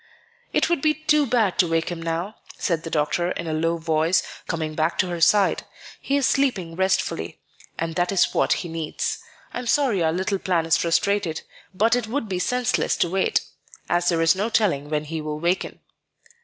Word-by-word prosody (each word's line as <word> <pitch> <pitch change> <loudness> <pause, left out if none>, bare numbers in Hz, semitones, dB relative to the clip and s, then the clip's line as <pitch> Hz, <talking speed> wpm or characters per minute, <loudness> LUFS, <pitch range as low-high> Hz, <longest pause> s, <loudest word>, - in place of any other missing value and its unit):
"It - - +2
would 340 -5 0
be 305 0 +2
too 300 -2 +2
bad 225 -6 +1
to 180 - +5
wake 165 0 0
him 175 -2 -5
now," 170 +5 -3 0.2
said 170 -3 -1
the 165 - -6
doctor, 160 +3 0
in 170 - -5
a 160 - -2
low 165 +2 0
voice, 160 +2 +1 0.2
coming 160 -2 -2
back 160 +2 0
to 180 - +1
her 170 -1 -4
side; 200 +3 +4 0.4
"he 280 - 0
is 280 - +2
sleeping 205 -12 0
restfully; 190 - -1 0.4
and 165 0 -2
that 175 +2 0
is 195 - +2
what - - +1
he - - -4
needs. 160 -2 -3 0.3
I - - -3
am 245 - -6
sorry 240 -7 +2
our 160 - +2
little 190 +3 -1
plan 175 -4 0
is 165 - +3
frustrated; 170 0 0 0.3
but 220 +5 +2
it 245 -3 -2
would 235 0 -2
be 185 -2 -2
senseless 250 +4 0
to 175 - +1
wait, 190 0 +1 0.5
as 175 0 +2
there 165 -2 +2
is 165 +1 +5
no 205 +4 -1
telling 175 -11 +1
when 150 -1 -1
he 160 +1 -5
will 150 0 -4
waken." 175 +3 -1
175 Hz, 200 wpm, -23 LUFS, 165-210 Hz, 0.5 s, to